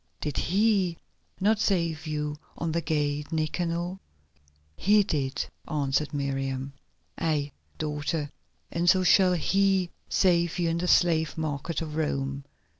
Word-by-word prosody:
Did 150 -2 -3
He 195 -2 +2 0.4
not 210 +2 +3
save 170 -6 0
you 150 -1 -2 0.2
on 165 -1 -2
the 170 +1 0
gate 150 -1 -1
Nicanor?" 170 +3 -1 0.8
"He 205 - +4
did," 135 -8 -1 0.2
answered 145 0 0
Miriam. 135 -1 -2 0.5
"Aye, 150 -3 0 0.3
daughter, 150 0 -2 0.4
and 170 +1 +2
so 185 0 +5
shall 185 0 +5
He 190 +1 +2 0.2
save 175 -2 +2
you 170 -2 +1
in 165 +1 0
the 180 - -1
slave 165 -3 +3
market 155 +1 -2
of 155 -1 -6
Rome. 140 -3 -2
160 Hz, 125 wpm, -27 LUFS, 145-180 Hz, 0.8 s, so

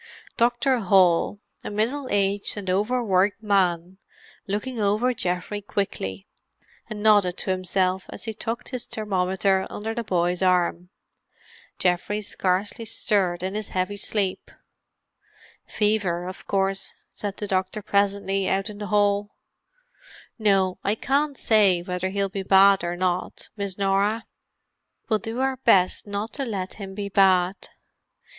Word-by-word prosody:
Dr. 240 +2 +2
Hall, 190 0 +3 0.2
a - - -5
middle 235 +7 -1
aged 200 +1 0
and 190 -3 -2
over 220 +6 +1
worked 200 +1 +1
man, 185 -3 +1 0.5
looked 205 +5 -2
over 230 0 +1
Geoffrey 180 0 -2
quickly, 95 - -3 0.6
and 210 -1 -6
nodded 205 -4 +4
to 190 - -2
himself, 185 0 0
as - - -7
he 225 - -4
tucked 225 +2 -4
his 250 -2 -5
thermometer 190 -2 0
under 220 +2 -4
the 235 0 -3
boy's 180 -3 0
arm. 180 -1 +1 0.9
Geoffrey 180 +3 0
scarcely 195 +3 -1
stirred 195 -5 0
in 190 +1 -2
his 215 0 -4
heavy 185 +2 -1
sleep. 200 -1 -2 1.2
"Fever 205 -5 0
of 185 +1 -8
course," 195 0 -1
said 205 -1 -5
the 210 - -4
doctor 190 +1 -1
presently, 200 -1 +1
out 195 +3 0
in 205 - -11
the 205 - -4
hall. 205 0 +1 1.0
"No, 195 -3 +2
I 205 - +1
can't 280 +4 0
say 205 -5 +4
yet 175 - -8
whether 180 0 -2
he'll 200 +1 0
be 195 0 -4
bad 195 0 +5
or 175 0 -2
not, 180 0 -2
Miss 200 -3 -4
Norah. 200 +3 +1 0.8
We'll 215 -2 +2
do 225 +5 -4
our 265 0 0
best 190 -6 +3
not 205 +2 -4
to 280 - -2
let 195 -7 -4
him 195 -1 -7
be 205 -1 -3
bad. 190 -1 +3
200 Hz, 140 wpm, -24 LUFS, 185-210 Hz, 1.2 s, bad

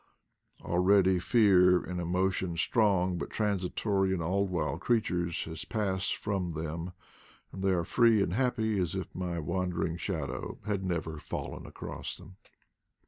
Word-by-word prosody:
Already 95 +1 +4
fear, 90 -2 +5
and 90 -1 -4
emo 90 +3 +1
tion 90 -2 -3
strong 95 -4 +2
but - - -4
transitory 100 -1 0
in 95 - 0
all 95 +5 0
wild 80 -6 -2
creatures, 90 -8 0
has 80 -1 -6
passed 95 -4 -1
from 95 -5 -2
them, 80 +3 -4 0.6
and 95 - -7
they 95 - +3
are 90 -3 +2
free 115 +3 +4
and 85 - -2
happy 110 -3 +1
as 90 -1 -1
if 95 - -5
my 90 -2 -3
wandering 85 0 -1
shadow 80 -7 -4
had 100 -3 -1
never 80 -4 -2
fallen - - -6
across - - -6
them. 95 +3 -14
90 Hz, 145 wpm, -30 LUFS, 85-100 Hz, 0.6 s, fear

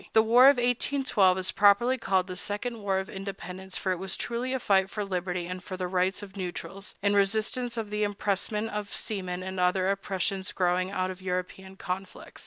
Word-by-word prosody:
The 220 - +6
war 240 +3 +7
of 280 -1 +8
1812 245 -5 +2
is 185 0 -1
properly 205 +5 +5
called 190 -7 +1
the 185 -1 -6
Second 210 +4 -3
War 195 -2 0
of 190 0 -2
Independence, 190 -1 -6
for 190 - -1
it 180 - -1
was 190 -1 -2
truly 245 +2 -2
a 260 - +1
fight 190 -4 +3
for 210 +1 -3
liberty 180 -2 -2
and 180 +1 -6
for 185 - -6
the 185 -1 -2
rights 185 +2 0
of 195 -1 -11
neutrals, 185 +1 -6
in 200 0 +3
resistance 220 +4 +1
to 225 - -1
the 210 0 -4
impressment 210 +1 -1
of 210 -1 -4
seamen 185 -4 -4
and 190 0 -5
other 185 +1 +2
oppressions 195 0 -2
growing 180 0 +1
out 185 -1 -1
of 185 0 -10
European 185 +1 -4
conflicts. 190 0 -6
195 Hz, 195 wpm, -28 LUFS, 185-210 Hz, -, of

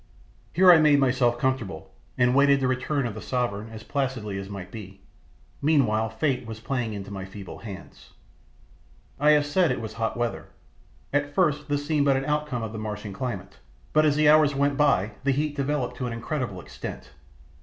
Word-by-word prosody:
Here 185 +1 +7
I 170 - +8
made 150 -2 +5
myself 125 -3 +2
comfortable, 130 -6 -2 0.3
and 125 0 +4
awaited 140 +1 +5
the 130 - +1
return 130 +2 -1
of 115 - -3
the 110 - -8
sovereign 115 -3 -2
as 110 -1 -9
placidly 125 -9 -2
as 100 0 -7
might 100 -1 -7
be. 100 -3 -9 0.6
Meanwhile 120 -8 +2
fate 125 +2 -1
was 110 -1 -7
playing 115 -1 -2
into 100 -1 -7
my 95 -1 -5
feeble 95 0 -9
hands. 100 -4 -10 1.1
I 150 +1 +4
have 145 -1 +3
said 170 +3 +2
it 125 - -1
was 110 -1 -6
hot 115 +1 -2
weather. 120 -1 -2 0.7
At 145 0 0
first 150 -5 +1
this 145 0 -1
seemed 145 -2 +1
but 135 -1 +4
an 135 - -2
outcome 150 -5 -1
of 110 - -4
the 110 - -5
Martian 105 -1 -5
climate, 100 -3 -5 0.3
but 155 - +5
as 150 -2 +3
the 150 0 +3
hours 150 -1 +5
went 140 +1 +1
by 135 -9 +2
the 140 - +1
heat 145 +2 0
developed 135 -3 -2
to 125 - -3
an 120 - -4
incredible 115 -4 -3
extent. - - -8
125 Hz, 190 wpm, -26 LUFS, 110-145 Hz, 1.1 s, I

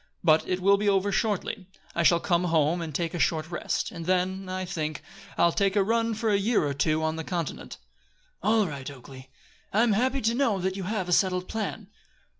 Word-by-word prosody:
But 160 -2 +4
it 185 0 -1
will 200 +2 +5
be 205 0 +1
over 200 0 +2
shortly. 200 -2 -1 0.3
I 170 - 0
shall 170 0 +5
come 175 0 +1
home 165 0 +2
and 160 -2 -4
take 165 +3 -2
a 175 - -3
short 160 +1 0
rest, 175 - -2
and 165 -1 -7
then, 185 +1 0
I 185 0 -3
think, 155 -5 -4 0.3
I'll 170 - +4
take 195 +2 +1
a 200 - +4
run 230 +2 +1
for 220 0 0
a 200 - +3
year 210 -4 +2
or 145 - -1
two 155 +3 0
on 160 0 -1
the 160 - -4
continent." 170 -2 -4 0.6
"All 220 -1 +3
right, 140 -6 -6
Oakleigh. 130 -1 -12 0.4
I 215 +3 +3
am 235 -3 +3
happy 260 +5 +1
to 225 +2 +1
know 240 -5 +1
that 190 0 -2
you 195 -2 -5
have 200 -2 -2
a - - -3
settled 180 0 +2
plan." 215 -1 -4
185 Hz, 220 wpm, -27 LUFS, 165-205 Hz, 0.6 s, will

